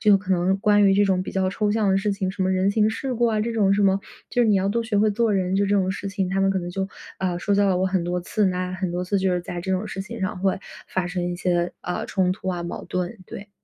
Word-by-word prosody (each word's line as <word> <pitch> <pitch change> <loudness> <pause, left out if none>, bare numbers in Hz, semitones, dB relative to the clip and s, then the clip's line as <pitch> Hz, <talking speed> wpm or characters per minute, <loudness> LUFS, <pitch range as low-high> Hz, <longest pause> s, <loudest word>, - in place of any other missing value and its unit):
就 205 -3 +5
可 190 -1 -8
能 185 +2 +2
关 205 -1 +4
于 195 - +5
这 205 +1 +4
种 190 -2 +1
比 - - -6
较 190 -1 +1
抽 210 +1 0
象 215 -2 +1
的 190 - +3
事 200 +1 0
情， 195 -2 -2
什 190 - -3
么 185 - +1
人 190 +1 +2
情 215 +1 +2
世 255 +3 -3
故 240 +1 +2
啊 220 -2 +1
这 230 +2 -1
种 205 -3 +3
什 205 - +2
么， 195 0 +3 0.3
就 245 - +2
是 225 - +3
你 205 - +4
要 190 +1 +1
多 230 +3 0
学 225 -3 0
会 215 +1 +4
做 230 0 +1
人， 190 -1 0
就 200 - +3
这 205 +1 +2
种 190 -1 +1
事 195 - -5
情， 195 -2 -2
他 195 +1 0
们 195 - +3
可 195 - 0
能 175 -1 -5
就， 190 +1 -3 0.3
啊， 180 -2 -1
说 200 +3 0
教 200 0 +3
了 180 -1 +2
我 190 - +1
很 185 -2 0
多 180 +1 -1
次， 200 +3 0
那 180 0 -1
很 185 -1 -2
多 180 +1 -2
次 200 +3 0
就 190 -1 +1
是 180 - 0
在 175 0 -6
这 190 - -4
种 190 +3 -1
事 195 -1 -5
情 230 +2 -8
上 190 -1 -2
会 195 0 +1 0.3
发 185 -2 -1
生 180 0 -3
一 175 0 -2
些， 175 -1 0
啊， 180 - -3
冲 185 -2 +1
突 190 0 -6
啊、 175 -2 -2
矛 170 - -5
盾， 180 +5 -3
对。 200 - -9
195 Hz, 335 characters per minute, -24 LUFS, 185-205 Hz, 0.3 s, 就